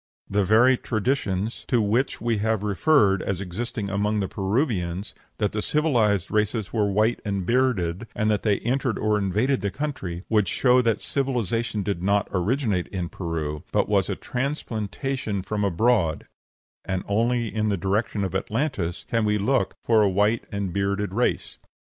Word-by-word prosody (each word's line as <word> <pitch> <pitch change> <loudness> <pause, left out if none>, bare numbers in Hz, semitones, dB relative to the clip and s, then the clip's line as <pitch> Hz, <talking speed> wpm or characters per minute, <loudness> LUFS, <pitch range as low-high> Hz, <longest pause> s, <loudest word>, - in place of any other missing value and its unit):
The 100 +1 +1
very 120 +6 +5
traditions 110 -3 -1
to 120 - +2
which 115 +5 +1
we 115 -1 0
have 110 0 0
referred 105 - +3
as 95 -3 -2
existing 100 +2 -4
among 105 +2 0
the 95 - -1
Peruvians, 100 - -1 0.2
that 105 -2 0
the 105 - -2
civilized 120 - +1
race 105 -2 0
were 105 -3 +2
white 110 +4 +2
and 100 -3 -2
bearded, 115 -5 +1
and 110 - 0
that 105 - +1
they 105 -3 +2
entered 125 -1 0
or 105 0 +1
invaded 105 +8 +1
the 100 - 0
country, 95 - -4
would 105 -4 +2
show 125 +6 +4
that 115 -3 +1
civilization 120 -5 -1
did 95 -3 -2
not 100 +2 +2
originate 100 0 0
in 90 -3 -4
Peru, 80 -4 -4
but - - +2
was - - +1
a - - -1
transplantation 125 -4 -3
from 105 +1 -2
abroad, 100 -3 +2 0.6
and 95 -1 -2
only 115 +2 +1
in 110 -1 0
the 100 - 0
direction 100 +3 -1
of 95 - -3
Atlantis 105 - -2
can 115 -1 +1
we 105 0 +2
look 130 +6 +1
for 115 -2 +4
a 100 - +4
white 105 +4 +1
and 100 -3 -3
bearded 100 0 -1
race. 120 +4 -1
105 Hz, 165 wpm, -25 LUFS, 95-120 Hz, 0.6 s, very